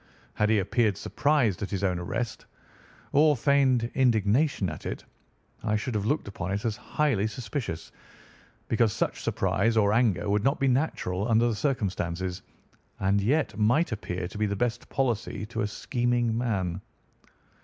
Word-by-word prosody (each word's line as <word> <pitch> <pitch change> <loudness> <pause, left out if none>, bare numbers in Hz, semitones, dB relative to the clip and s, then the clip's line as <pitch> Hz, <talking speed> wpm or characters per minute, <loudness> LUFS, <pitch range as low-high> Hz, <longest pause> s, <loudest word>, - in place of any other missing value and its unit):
Had 105 0 +1
he 110 - +4
appeared 105 +1 +1
surprised 140 - +1
at 100 - -3
his 100 -1 -3
own 90 -2 +1
arrest, 110 +7 -4 0.6
or 150 0 +4
feigned 130 -3 +3
indignation 120 -1 +2
at 80 -3 -6
it, - - -5 0.6
I 105 - +1
should 115 +4 -2
have 105 -1 -1
looked 145 -1 0
upon 95 -2 -4
it 100 +3 -3
as 110 -2 0
highly 120 -2 0
suspicious, 110 - -5 0.8
because 115 -2 +2
such - - -2
surprise 115 0 +1
or 105 -1 +4
anger 110 -5 +2
would 100 +1 +1
not 135 +3 +2
be 135 - +2
natural 125 - 0
under 115 0 +4
the 120 - +1
circumstances, 95 - -2 0.6
and 100 +1 +2
yet 140 +9 +1
might 120 +10 +3
appear 90 -5 -3
to 105 - -8
be 105 - +2
the 100 - -2
best 120 +3 -2
policy 120 -5 -1
to 115 0 -4
a 105 - +1
scheming 120 +1 0
man. 100 -7 -1
110 Hz, 160 wpm, -27 LUFS, 100-125 Hz, 0.8 s, he